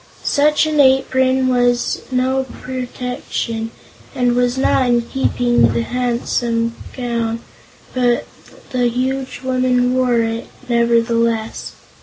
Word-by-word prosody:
Such 300 +2 +3
an 310 -1 0
apron 260 -1 +3
was 245 -1 +1
no 260 +1 +1 0.2
protection, 250 -3 -4 0.5
and 245 -1 +2
was 245 +1 +1
not 265 -1 +2
in 240 -1 +2
keeping 245 -1 0
with 115 -1 +4
the 115 - +1
handsome 235 - -1 0.2
gown, 235 -2 -2 0.5
but 245 -1 +1 0.5
the 250 -2 +1
huge 260 +2 -2
woman 255 -1 +1
wore 250 -2 +2
it, 225 0 -3 0.2
nevertheless. 230 -1 +1
245 Hz, 110 wpm, -18 LUFS, 235-260 Hz, 0.5 s, with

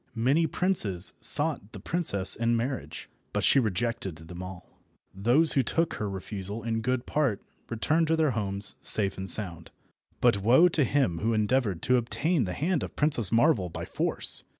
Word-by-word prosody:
Many 135 +8 +1
princes 140 - 0
sought 145 -9 +3
the 100 - -9
princess 100 - +2
in 115 0 0
marriage, 130 +3 -5 0.3
but - - -2
she - - +4
rejected 110 -4 -2
them 80 +3 -11
all. 90 -1 -11 0.3
Those 120 +12 +2
who 135 - +2
took 165 +6 -1
her 105 - -3
refusal 100 +2 -7
in 115 0 -2
good 125 +1 -2
part 140 -10 -1 0.3
returned 155 +8 0
to 160 - +2
their 155 -3 +1
homes 100 -3 -3
safe 100 -3 -1
and 95 0 -5
sound, 85 -6 +2 0.5
but 100 - +2
woe 125 - +5
to 160 -3 +1
him 115 -11 0
who 115 +1 -1
endeavoured 110 -4 -1
to 125 0 +2
obtain 130 +4 -1
the 90 - -5
hand 165 - -1
of - - -7
Princess 145 -9 +2
Marvel 115 - +2
by 85 +1 -7
force! - - +3
115 Hz, 175 wpm, -27 LUFS, 100-145 Hz, 0.5 s, woe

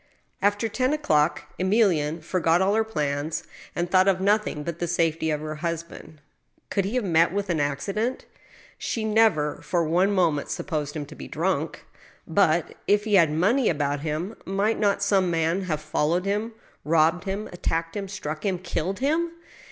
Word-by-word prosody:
After 205 +3 +2
ten 255 +6 0
o'clock 160 - +1 0.2
Emilienne 180 -6 +2
forgot 170 0 +2
all 190 +2 +2
her 220 +1 +3
plans, 150 -6 -2 0.3
and 175 - -1
thought 185 +2 +4
of 190 -2 +3
nothing 200 -6 +1
but 170 +1 -5
the 175 - -1
safety 165 -1 0
of 150 -1 -1
her 155 0 -5
husband. 165 -2 -6 0.5
Could 195 -2 +1
he 205 +6 -3
have 250 - +1
met 170 -3 +3
with 200 -1 -2
an 165 - 0
accident? 195 - -2 0.5
She 225 -2 -2
never 210 -9 +2
for 175 -2 0
one 180 +5 +2
moment 170 -7 +1
supposed 150 -4 -3
him 150 -2 -3
to 150 - -12
be - - -9
drunk; 165 -1 -2 0.4
but, 170 -1 +2
if 205 +1 +3
he 215 -1 -2
had 170 -5 +6
money 210 - +2
about 145 -3 0
him, 160 +8 -3
might 200 +4 0
not 200 -1 +2
some 195 -3 +3
man 165 +3 0
have 155 -4 -1
followed 155 +3 0
him, 210 +3 -1 0.3
robbed 165 +3 +2
him, 200 +2 -3
attacked 165 -1 -2
him, 200 -1 -3
struck 160 -6 -5
him, 190 -3 0
killed 180 +1 -3
him 320 +5 +1
175 Hz, 175 wpm, -25 LUFS, 155-200 Hz, 0.5 s, had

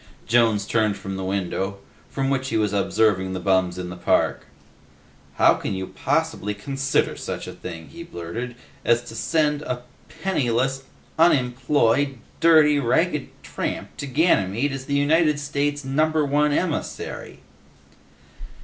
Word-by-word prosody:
Jones 110 -3 +3
turned 110 -2 +1
from 95 0 -6
the 95 - -4
window, 95 +1 -2 0.3
from 135 0 -1
which 135 -1 -1
he - - 0
was 105 -2 +1
observing 100 -2 +1
the 95 - -3
bums 95 -1 +1
in 90 -1 -5
the - - -6
park. 90 - +1 0.9
"How - - +6
can - - -3
you 95 0 -3
possibly 105 +2 -1
consider 135 +6 0
such - - -5
a - - -7
thing," 85 -2 -8
he 170 - -10
blurted, 120 - -6 0.3
"as 120 0 +3
to 115 - -10
send 150 +1 +1
a 125 -4 -4 0.4
penniless, 135 -6 0 0.3
unemployed, 135 -2 +3 0.2
dirty, 155 -3 +6
ragged 120 -3 +1
tramp - - -4
to 140 - -5
Ganymede 135 - +2
as 135 -1 -5
the 140 - 0
United 150 +1 +3
States' 145 0 -2
Number 155 +3 +2
One 145 +1 +2
emissary?" 160 +1 -3
130 Hz, 140 wpm, -23 LUFS, 100-145 Hz, 0.9 s, How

